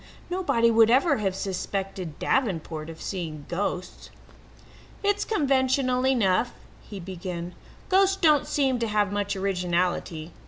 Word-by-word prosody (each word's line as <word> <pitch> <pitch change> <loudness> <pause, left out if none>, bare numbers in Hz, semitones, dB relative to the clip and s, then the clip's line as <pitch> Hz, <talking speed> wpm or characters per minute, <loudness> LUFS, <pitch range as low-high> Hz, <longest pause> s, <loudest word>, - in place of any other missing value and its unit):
Nobody 275 -11 +2
would 225 0 +5
ever 275 +4 +4
have 195 -3 -1
suspected 190 -3 -4
Davenport 165 - -1
of 160 - -9
seeing 160 -6 -5
ghosts. 185 0 -4 0.9
"It's 410 0 +2
conventional 260 - +1
enough," 235 -3 +2 0.3
he 205 - -9
began. 180 -1 -6 0.3
"Ghosts 390 0 +4
don't 305 -6 +3
seem 265 -4 +1
to 230 - 0
have 210 -2 +1
much 205 0 -1
originality. 180 -3 -1
205 Hz, 120 wpm, -26 LUFS, 180-260 Hz, 0.9 s, would